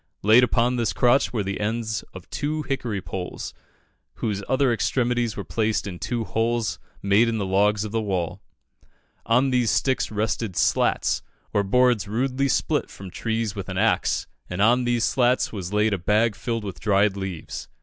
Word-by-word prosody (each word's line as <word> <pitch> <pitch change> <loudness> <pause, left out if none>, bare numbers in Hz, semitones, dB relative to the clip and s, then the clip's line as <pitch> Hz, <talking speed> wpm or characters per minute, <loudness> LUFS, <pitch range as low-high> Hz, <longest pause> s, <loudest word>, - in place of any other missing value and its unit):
Laid 110 +5 +7
upon 125 0 +2
this 115 -3 0
crotch 125 +3 +3
were 110 -4 -1
the 100 0 -3
ends 110 +1 -2
of 95 -2 -11
two 155 +1 -2
hickory 120 -9 -3
poles, 90 -2 -5 0.6
whose 105 -3 -2
other 130 -1 +3
extremities 120 +2 0
were 100 - -3
placed 110 -1 -1
in 90 -4 -6
two 115 +1 -2
holes 115 +2 -1 0.2
made 100 +4 +4
in 115 -1 0
the 100 - -1
logs 100 +2 +2
of 105 - -5
the 115 0 0
wall. 95 -2 -2 0.9
On 125 +4 +3
these 125 -3 +2
sticks 130 -1 +1
rested 105 -2 -2
"slats," - - +2 0.3
or 105 - +3
boards 120 +1 +2
rudely 130 +5 0
split - - 0
from 95 -2 -10
trees 110 +1 -2
with 100 -1 -6
an 95 - -4
axe, 110 +3 +1 0.2
and 90 - -4
on 120 +4 +4
these 120 -1 +1
slats 125 0 +2
was 95 -3 -5
laid 105 +1 +2
a 100 - -1
bag 105 +5 +2
filled 115 +3 -3
with 100 -3 -6
dried 100 -1 +2
leaves. 95 -5 -6
110 Hz, 175 wpm, -24 LUFS, 100-120 Hz, 0.9 s, Laid